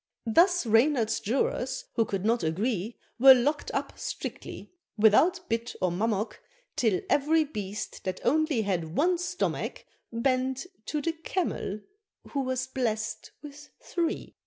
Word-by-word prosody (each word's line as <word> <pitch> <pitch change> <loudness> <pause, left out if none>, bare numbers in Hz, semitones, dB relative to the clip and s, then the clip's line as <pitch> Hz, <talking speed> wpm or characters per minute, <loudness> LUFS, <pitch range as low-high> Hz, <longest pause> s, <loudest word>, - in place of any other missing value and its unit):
Thus 350 - +4
Reynard's 225 0 +3
Jurors, 260 +2 -1
who 225 - +2
could 195 -1 -3
not 230 +2 +2
agree, 200 +6 -1 0.2
Were 265 +1 +10
lock'd 285 +4 0
up - - -3
strictly, - - -6 0.2
without 315 - +4
bit 230 +1 -2
or 180 - +1
mummock, 210 +3 -1 0.3
Till 220 -6 +1
every 310 +3 +3
Beast 210 -8 -6
that 185 -1 -2
only 300 -4 +2
had 170 -5 -2
one 350 +3 +3
stomach, 360 +1 -3 0.3
Bent 255 +3 0 0.2
to 300 -2 -2
the 330 - 0
Camel, 325 - -3 0.5
who 280 - -2
was 260 -1 -1
blest 230 -4 -2
with 295 0 -11
three. 340 -2 -3
250 Hz, 135 wpm, -28 LUFS, 215-295 Hz, 0.5 s, Were